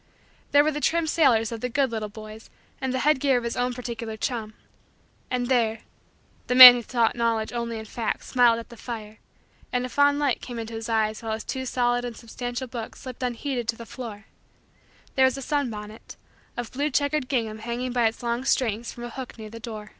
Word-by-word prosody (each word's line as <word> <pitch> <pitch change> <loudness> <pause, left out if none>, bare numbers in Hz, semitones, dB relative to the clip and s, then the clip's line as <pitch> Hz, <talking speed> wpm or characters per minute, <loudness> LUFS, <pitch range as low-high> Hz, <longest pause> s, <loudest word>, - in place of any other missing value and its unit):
There 290 0 +6
were 310 - +1
the 295 0 -4
trim 335 +2 +2
sailors 250 -9 +3
of 230 -1 -5
the 250 - -2
good 270 0 +1
little 215 -2 -3
boys 215 +1 -11 0.3
and 265 -1 -1
the 260 - -1
head 300 -2 +4
gear 270 -2 +3
of 240 - -2
his 235 - -3
own 245 0 0
particular 230 -3 -5
chum. 220 -3 -3 0.7
And 250 -1 -1
there 230 -3 +1 0.7
the 250 - 0
man 250 -1 +14
who 245 - -2
sought 235 -1 +1
Knowledge 230 -2 0
only 235 -1 -3
in 220 - -7
facts 220 +1 -3
smiled 240 -2 +4
at 230 - -8
the 235 - -12
fire 220 -3 -7 0.5
and 250 0 0
a - - -6
fond 285 +2 +3
light 285 -4 0
came 245 -2 -7
into 230 0 -6
his 225 +1 -5
eyes 220 -1 0
while 225 -1 -3
his 220 - -4
too 260 -1 -4
solid 245 -1 +1
and 240 -2 -6
substantial 245 +2 -5
hook 230 -2 -7
slipped 255 -2 -9
unheeded 250 0 -2
to 230 - 0
the 230 - -10
floor 225 -4 -8 0.9
there 265 - +4
was 260 0 +1
a - - -6
sunbonnet 225 -7 -4 0.4
of 240 -2 -4
blue 285 +3 -1
checkered 285 -1 0
gingham 225 -5 -1
hanging 240 +3 -3
by 240 -2 +3
its 225 +2 -5
long 235 +1 -1
strings 235 -4 0
from 240 - -10
a 240 - -5
hook 260 -2 -8
near 215 -1 -9
the 230 0 -9
window. 215 -1 -8
240 Hz, 215 wpm, -25 LUFS, 225-255 Hz, 0.9 s, man